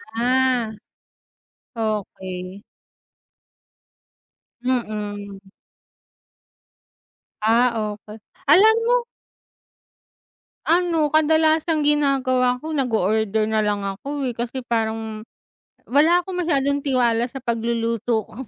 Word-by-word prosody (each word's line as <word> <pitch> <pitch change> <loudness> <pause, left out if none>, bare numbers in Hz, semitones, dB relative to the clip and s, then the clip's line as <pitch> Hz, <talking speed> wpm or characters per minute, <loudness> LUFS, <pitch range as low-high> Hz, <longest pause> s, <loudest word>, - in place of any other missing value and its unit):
Ah. 250 -1 +1 1.1
Okey. 190 -3 -4 2.0
Mm. 210 -5 -3 2.0
Ah, 235 +3 +3 0.2
okey. 210 +1 -12 0.3
Alam 410 +9 +7
mo 485 0 +2 1.6
Ano, 330 -3 +2
kadalasang 315 0 +3
ginagawa 260 -4 +2
ko, 315 +4 -6
nag-o-order 220 -4 +1
nalang 210 -2 0
ako, 275 +8 -4
eh. 245 - -2
Kasi 245 +2 -5
parang 220 -2 -2 0.6
wala 330 +6 +3
akong 365 -2 -4
masyadong 280 -4 +1
tiwala 245 -3 +1
sa 265 0 -9
pagluluto 230 -1 -1
ko. - - -18
245 Hz, 80 wpm, -22 LUFS, 220-290 Hz, 2.0 s, Alam